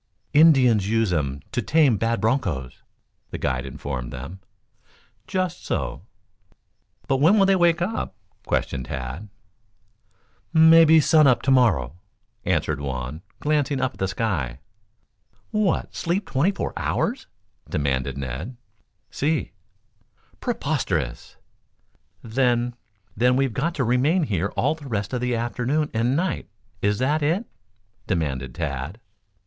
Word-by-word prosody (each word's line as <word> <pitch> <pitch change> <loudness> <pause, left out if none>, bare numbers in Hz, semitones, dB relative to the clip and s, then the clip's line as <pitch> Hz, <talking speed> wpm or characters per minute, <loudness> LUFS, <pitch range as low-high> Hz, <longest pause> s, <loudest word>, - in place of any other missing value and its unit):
"Indians 130 -10 +5
use 110 -4 +1
'em 70 -3 -1
to 120 - -1
tame 140 +1 +3
bad 115 +3 0
bronchos," 100 - -1 0.5
the - - -5
guide 65 +1 -2
informed 65 -2 -5
them. 70 +10 -8 0.9
"Just 185 -2 -2
so." - - -3 1.1
"But, 135 - +2
when 165 +10 +5
will 195 - +5
they 195 0 +4
wake 175 -1 +3
up?" 220 +5 -3 0.3
questioned 65 -2 -1
Tad. 70 - -6 1.2
"Mebby 160 0 +7
sun 155 0 +5
up 125 -3 +3
to 135 - +2
morrow," 90 - +2 0.5
answered 75 -2 0
Juan, 65 +2 -4 0.2
glancing 145 -2 +1
up 130 0 0
at - - -19
the 95 - 0
sky. 90 - -2 0.9
"What, 210 -5 0
sleep 185 +4 -1
twenty 135 +7 +3
four 200 - -4
hours?" - - -1 0.4
demanded 70 -2 -1
Ned. 70 - -5 0.5
"Si." 155 +3 -1 0.9
"Preposterous." 130 - -2 0.9
"Then, 120 0 +1 0.4
then, 125 +3 +3
we've 135 -2 +1
got 165 +7 -1
to 140 - 0
remain 130 +9 +2
here 100 - 0
all - - +2
the 155 -3 -11
rest 105 0 -2
of 125 - -1
the 125 -1 0
afternoon 125 +6 -1
and 120 +4 +1
night 170 -1 -2 0.3
is 105 0 +1
that 145 +5 +1
it?" 170 +10 +1 0.6
demanded 65 -7 -2
Tad. 75 - -4
120 Hz, 125 wpm, -24 LUFS, -, 1.2 s, Mebby